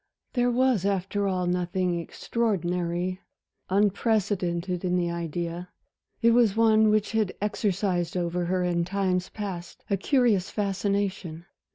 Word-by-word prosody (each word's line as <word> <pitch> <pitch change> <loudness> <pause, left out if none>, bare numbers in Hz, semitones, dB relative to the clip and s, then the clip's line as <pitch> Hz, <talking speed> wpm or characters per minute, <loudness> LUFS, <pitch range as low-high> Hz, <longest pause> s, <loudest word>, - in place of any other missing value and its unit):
There 245 -1 +2
was 245 -5 +2
after 200 +1 0
all 185 -2 0
nothing 180 0 0
extraordinary, 180 -3 -2 0.5
unprecedented 190 -3 +1
in 180 -1 +1
the 175 -1 0
idea; 170 +1 -4 0.5
it 230 - +6
was 230 -4 +4
one 220 -1 +5
which 215 -1 +2
had 220 -4 0
exercised 195 -4 -1
over 175 0 -1
her 180 +1 0
in 175 -1 +1
times 185 0 -1
past 190 -5 -7
a 200 - +3
curious 225 -4 +2
fascination. 195 -4 -2
185 Hz, 125 wpm, -26 LUFS, 175-210 Hz, 0.5 s, it